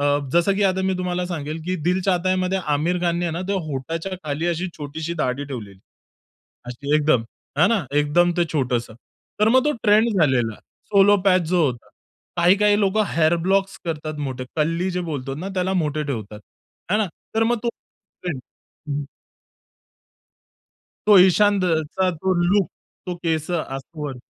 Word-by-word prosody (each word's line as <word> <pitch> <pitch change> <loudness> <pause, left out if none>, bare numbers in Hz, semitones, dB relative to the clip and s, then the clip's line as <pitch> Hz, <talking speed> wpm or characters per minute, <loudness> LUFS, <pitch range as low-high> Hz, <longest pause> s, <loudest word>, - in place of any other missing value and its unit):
अ, - - 0
जसं 175 +3 +4
की 205 - +1
आता 190 -1 +2
मी 190 - +1
तुम्हाला 180 0 -2
सांगेल, 160 -2 -4
की 185 +1 -1
दिल 180 +1 +2
चाहतायामध्ये 185 0 +1 0.2
आमिर 170 +5 0
खान 170 -1 +1
ने 175 -1 -1
ना 170 - -3
ते 200 - 0
होटाच्या 165 +6 -4
खाली 155 +3 -2
अशी 175 +2 -1
छोटीशी 155 +3 -5
दाढी 125 +3 -1
ठेवलेली. 105 -8 -8 0.9
अशी 140 +4 -3
एकदम, 150 -6 +3 0.3
है 160 - +6
ना 220 -7 +1
एकदम 170 +4 +3
ते 175 - +3
छोटंसं. 125 -6 -1 0.5
तर 210 - +5
मग 255 +3 +4
तो 300 - +2
ट्रेंड 215 +2 +5
झालेला. 125 -8 +2 0.4
Soul 200 0 +6
patch. 185 -2 +4
जो 175 -1 +3
होता. 125 -3 -5 0.5
काही 175 +3 +5
काही 210 0 +3
लोकं 205 +2 +2
हेअर 160 +1 +3
ब्लॉक्स 195 +3 0
करतात 155 -2 -4
मोठे, 130 -1 -5
कल्ली 165 +4 0
जे 180 0 -2
बोलतो 135 -2 -4
ना 170 +7 -5
त्याला 185 0 0
मोठे 150 0 -1
ठेवतात. 110 -7 -5 0.5
है - - +4
ना? 215 - +1 0.3
तर 225 - +3
मग 240 0 +1
तो 240 - 0 0.5
ट्रेंड 170 -8 -3 0.5
हं, 140 - -1
हं. 145 - -2 2.0
तो 210 -2 +8
इशांद 195 +1 +4
अ, 165 -3 +2
चा 190 -1 +1
तो 185 +3 -1
लूक 200 -1 +3 0.4
तो 180 - -3
केस 160 -2 -2
असं 155 -1 -4
वर. 135 -4 -5
170 Hz, 170 wpm, -22 LUFS, 145-190 Hz, 2.0 s, तो